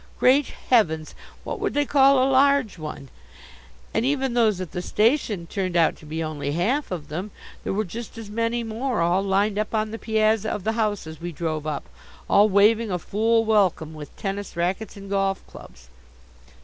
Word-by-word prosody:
Great 265 +3 +4 0.2
heavens, 160 -10 +3 0.3
what - - -5
would - - -2
they 290 0 +2
call 275 -1 +5
a 270 +1 +2
large 270 -7 +3
one? 150 -3 -7 0.8
And - - +1
even 265 -1 0
those 220 -5 +2
at 185 -4 -5
the 180 - -4
station 215 - +1
turned 185 0 -2
out 165 - +3
to 155 - -14
be 160 +2 -3
only 145 -2 -3
half 235 - 0
of 160 -5 -5
them. 180 +7 -4 0.3
There - - -2
were 215 +2 0
just 225 +5 -8
as 225 -2 -7
many 230 +3 -1
more 230 0 -2
all 175 +3 +2
lined 200 +1 +1
up 215 +1 -2
on 215 0 0
the 225 - -6
piazza 220 -1 +1
of 205 - -3
the 220 - +1
house 215 -4 -1
as 160 0 -10
we 175 0 -4
drove 155 -1 -3
up, 150 -2 -4 0.4
all 205 +1 +5
waving 215 +3 +4
a 180 - 0
fool 225 +6 +1
welcome 190 -7 +2
with 150 -2 -10
tennis 200 0 -4
rackets 185 +5 -2
and 200 0 -10
golf 195 -1 -1
clubs. - - -14
205 Hz, 190 wpm, -24 LUFS, 170-225 Hz, 0.8 s, call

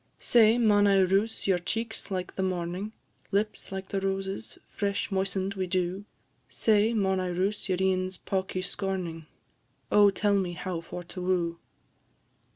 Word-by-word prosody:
Say, 225 -1 +5
maun 205 -3 +4
I 200 -1 +5
roose 195 +4 +1
your 190 -2 +3
cheeks 225 +6 -3
like 185 -2 -4
the - - -2
morning? 185 +2 -2 0.4
Lips, 210 +1 -1
like 190 0 -5
the 195 -2 -1
roses, 195 +2 -3
fresh 200 0 -2
moisten'd 195 0 -1
wi' 190 -2 -2
dew; 185 +2 -1 0.4
Say, 215 0 +3
maun 190 -3 +2
I 185 - -1
roose 190 +4 -1
your 185 - +2
een's 185 -1 0
pawkie 190 -1 -2
scorning? 180 -5 -3 0.6
Oh, 205 -1 +7
tell 200 +1 +1
me 190 -3 +1
how 175 -1 -4
for 175 +1 -7
to 180 +1 -8
woo! 175 -2 0
190 Hz, 155 wpm, -28 LUFS, 185-205 Hz, 0.6 s, Oh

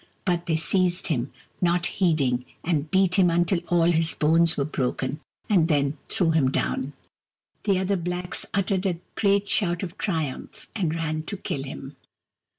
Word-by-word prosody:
But 175 -2 0
they 165 - +2
seized 180 +3 +1
him, 130 -4 -1 0.3
not 175 -1 +2
heeding, 140 -9 +1 0.2
and 155 -3 0
beat 190 +1 +3
him 180 -2 +5
until 175 +2 +2
all 175 -1 +3
his 165 0 +1
bones 165 +2 +3
were 140 - +1
broken, 135 0 -2 0.3
and 180 -6 +4
then 145 -2 +1
threw 170 -4 +1
him 155 -5 +3
down. 135 +1 -1 0.7
The 200 -3 +3
other 190 +1 +1
blacks 180 +1 -3
uttered 195 -1 0
a 175 -3 -1 0.2
great 200 -1 +2
shout 175 -5 0
of 180 - -6
triumph, 160 -9 -3
and 170 -7 0
ran 155 -1 -2
to 200 - -4
kill 140 - -3
him. 135 +1 -8
170 Hz, 160 wpm, -25 LUFS, 150-185 Hz, 0.7 s, him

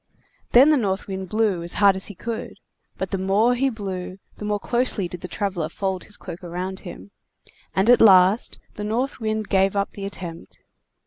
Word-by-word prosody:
Then 270 +5 +8
the 305 - +4
North 195 -5 -1
Wind 190 -2 -5
blew 215 -5 +1
as 170 +1 -2
hard 200 -2 +5
as 190 - -5
he 205 - -9
could, 230 +4 -5 0.4
but 190 - -4
the 195 - -1
more 200 +6 +3
he 270 +2 +1
blew 190 -5 -5 0.2
the 210 - -6
more 210 0 0
closely 240 -5 0
did 175 0 -8
the 180 - -5
traveler 180 -5 -2
fold 190 +1 -3
his 210 - -7
cloak 170 - -9
around 180 +2 -4
him; 100 - -10 0.6
and 190 +3 +2
at 245 0 +6
last 195 0 +5 0.2
the 210 - -6
North 240 +7 -1
Wind 215 -2 -2
gave 195 +1 +2
up 200 0 0
the 200 - -7
attempt. 175 -4 -8
195 Hz, 195 wpm, -23 LUFS, 185-220 Hz, 0.6 s, Then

